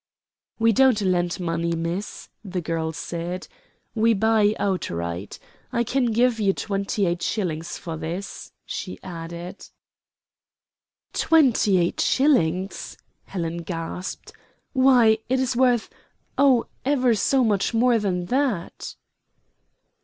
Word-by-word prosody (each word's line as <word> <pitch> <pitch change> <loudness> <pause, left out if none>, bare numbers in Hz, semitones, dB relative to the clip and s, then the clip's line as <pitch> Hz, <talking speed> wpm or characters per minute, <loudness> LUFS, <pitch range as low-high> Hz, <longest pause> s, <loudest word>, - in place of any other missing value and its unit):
"We 225 0 +4
don't 255 0 +4
lend 175 -2 0
money, 170 -1 -1
miss," 170 +5 -4 0.2
the 190 -3 -4
girl 165 -1 -2
said, 170 +2 -5 0.5
"we 225 0 +3
buy 215 0 +3
outright. 85 - -3 0.3
I 235 - +1
can 260 +2 0
give 235 +1 +2
you 200 -2 +2
twenty 200 0 -1
eight 175 0 -1
shillings 170 -6 -2
for 165 -2 -6
this," 170 +5 -6
she 90 - -5
added. 170 0 -8 1.5
"Twenty 255 - +4
eight 175 -1 0
shillings," 190 - +1 0.3
Helen 170 -3 -4
gasped; 170 +1 -6 0.4
"why, 250 -5 +5
it 260 +1 +2
is 255 -1 0
worth 245 -2 +3 0.5
oh, 265 -4 +4 0.2
ever 255 -3 +2
so 255 +5 +2
much 205 -4 +1
more 235 0 +3
than 180 -4 -1
that!" 250 -5 -2
195 Hz, 115 wpm, -24 LUFS, 170-235 Hz, 1.5 s, why